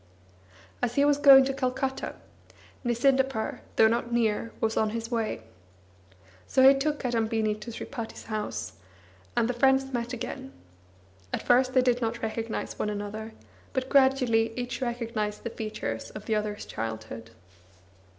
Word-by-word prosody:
As 245 Hz, -1 st, -1 dB
he 280 Hz, -, +4 dB
was 290 Hz, 0 st, +3 dB
going 270 Hz, -2 st, +9 dB
to 270 Hz, -, -1 dB
Calcutta, 265 Hz, 0 st, -2 dB, 0.7 s
Nisindapur, 265 Hz, 0 st, +1 dB
though 220 Hz, -, +6 dB
not 235 Hz, +1 st, 0 dB
near, 230 Hz, -1 st, +1 dB
was 225 Hz, 0 st, 0 dB
on 220 Hz, -, +2 dB
his 230 Hz, +1 st, -6 dB
way. 225 Hz, -, -2 dB, 1.0 s
So 260 Hz, 0 st, +6 dB
he 270 Hz, -, +9 dB
took 295 Hz, +2 st, 0 dB
Kadambini 225 Hz, -3 st, 0 dB
to 215 Hz, -, -8 dB
Sripati 230 Hz, 0 st, -6 dB
s -, -, -10 dB
house, 210 Hz, -, -4 dB, 0.6 s
and 225 Hz, -, +3 dB
the 250 Hz, -, 0 dB
friends 265 Hz, +1 st, +3 dB
met 240 Hz, 0 st, -2 dB
again. 265 Hz, +2 st, -6 dB, 0.8 s
At -, -, -2 dB
first 255 Hz, +1 st, +4 dB
they 255 Hz, -, +5 dB
did 245 Hz, -1 st, +2 dB
not 230 Hz, 0 st, -2 dB
recognise 225 Hz, 0 st, -3 dB
one 210 Hz, -, 0 dB
another, 210 Hz, +2 st, -5 dB, 0.4 s
but 260 Hz, 0 st, -2 dB
gradually 255 Hz, -5 st, +3 dB
each 245 Hz, +1 st, -4 dB
recognised 230 Hz, -4 st, -2 dB
the 230 Hz, -, -4 dB
features 215 Hz, -, -4 dB
of 215 Hz, -, -9 dB
the 220 Hz, -, 0 dB
other's 210 Hz, 0 st, -2 dB
childhood. 110 Hz, 0 st, -6 dB
235 Hz, 150 wpm, -28 LUFS, 220-260 Hz, 1.0 s, going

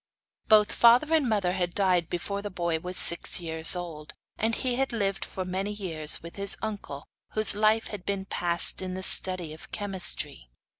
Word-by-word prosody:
Both 210 Hz, -1 st, +5 dB
father 245 Hz, +7 st, +4 dB
and 300 Hz, -6 st, +2 dB
mother 200 Hz, -5 st, 0 dB
had 180 Hz, -1 st, -2 dB
died 180 Hz, -4 st, +1 dB
before 200 Hz, +3 st, -4 dB
the 205 Hz, -, -6 dB
boy 170 Hz, -4 st, -2 dB
was 180 Hz, +2 st, -7 dB
six 170 Hz, -, +2 dB
years 160 Hz, 0 st, +4 dB
old; 165 Hz, -4 st, -8 dB, 0.2 s
and 225 Hz, +1 st, -1 dB
he 250 Hz, -2 st, -2 dB
had 270 Hz, 0 st, 0 dB
lived 200 Hz, -4 st, -2 dB
for 185 Hz, -, -6 dB
many 190 Hz, +3 st, -3 dB
years 165 Hz, -8 st, -2 dB
with 170 Hz, +3 st, -11 dB
his 200 Hz, 0 st, +1 dB
uncle, 205 Hz, -10 st, -6 dB, 0.3 s
whose 215 Hz, -1 st, +4 dB
life 215 Hz, +2 st, +2 dB
had 205 Hz, -4 st, -8 dB
been 195 Hz, -1 st, -3 dB
passed 175 Hz, -1 st, -1 dB
in 185 Hz, -1 st, -5 dB
the 190 Hz, -, -5 dB
study 185 Hz, -4 st, +4 dB
of 155 Hz, -, -12 dB
chemistry. 180 Hz, -, -4 dB
190 Hz, 185 wpm, -27 LUFS, 175-210 Hz, 0.3 s, Both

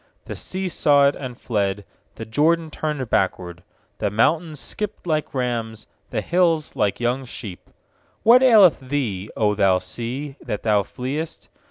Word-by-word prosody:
3The -, -, -6 dB
sea 190 Hz, 0 st, -3 dB
saw 145 Hz, -5 st, +4 dB
it, 140 Hz, -, +1 dB
and 125 Hz, -3 st, -7 dB
fled; 100 Hz, -3 st, -1 dB, 0.3 s
The 115 Hz, -, -7 dB
Jordan 160 Hz, +8 st, +1 dB
turned 150 Hz, -5 st, -3 dB
backward. 90 Hz, -2 st, -1 dB, 0.4 s
4The -, -, -1 dB
mountains 155 Hz, +8 st, +1 dB
skipped 210 Hz, +5 st, -5 dB
like 155 Hz, -3 st, -1 dB
rams, 115 Hz, -4 st, -2 dB, 0.2 s
The -, -, -2 dB
hills 170 Hz, -3 st, +1 dB
like 105 Hz, -2 st, 0 dB
young 120 Hz, +3 st, 0 dB
sheep* 110 Hz, -7 st, -9 dB, 0.6 s
8What 240 Hz, +3 st, +8 dB
aileth 220 Hz, -9 st, +6 dB
thee, 125 Hz, -8 st, -3 dB
0 105 Hz, -2 st, +2 dB
thou 100 Hz, -3 st, +3 dB
sea, 125 Hz, +9 st, -5 dB
that 105 Hz, -, -4 dB
thou 105 Hz, -2 st, +3 dB
fleest? 135 Hz, +10 st, -5 dB
130 Hz, 150 wpm, -22 LUFS, 105-155 Hz, 0.6 s, 8What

